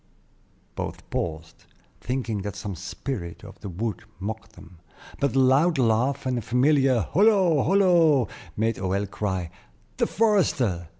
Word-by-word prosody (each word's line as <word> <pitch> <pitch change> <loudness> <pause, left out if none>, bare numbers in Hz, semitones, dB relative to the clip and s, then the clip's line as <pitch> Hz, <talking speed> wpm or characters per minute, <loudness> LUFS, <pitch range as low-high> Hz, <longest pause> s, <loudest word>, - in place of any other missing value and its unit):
Both - - -6
paused, 80 -1 -4 0.3
thinking 120 -5 -3
that 100 -1 -5
some 100 - -5
spirit 95 +1 -6
of 100 -1 -12
the 100 - -7
wood 100 +3 -4 0.2
mocked 110 +3 -6
them; 85 -1 -15 0.4
but 140 -1 0
a - - +4
loud 140 +6 +4
laugh, 125 +3 +1
and 125 -2 0
a - - -5
familiar 130 0 +3
"Holo! 190 - +3
holo!" 170 - +4 0.3
made 115 0 0
Hoël 95 +2 -1
cry, 95 -5 -3 0.5
"The - - +2
forester!" 140 - +1
120 Hz, 135 wpm, -25 LUFS, 100-140 Hz, 0.5 s, a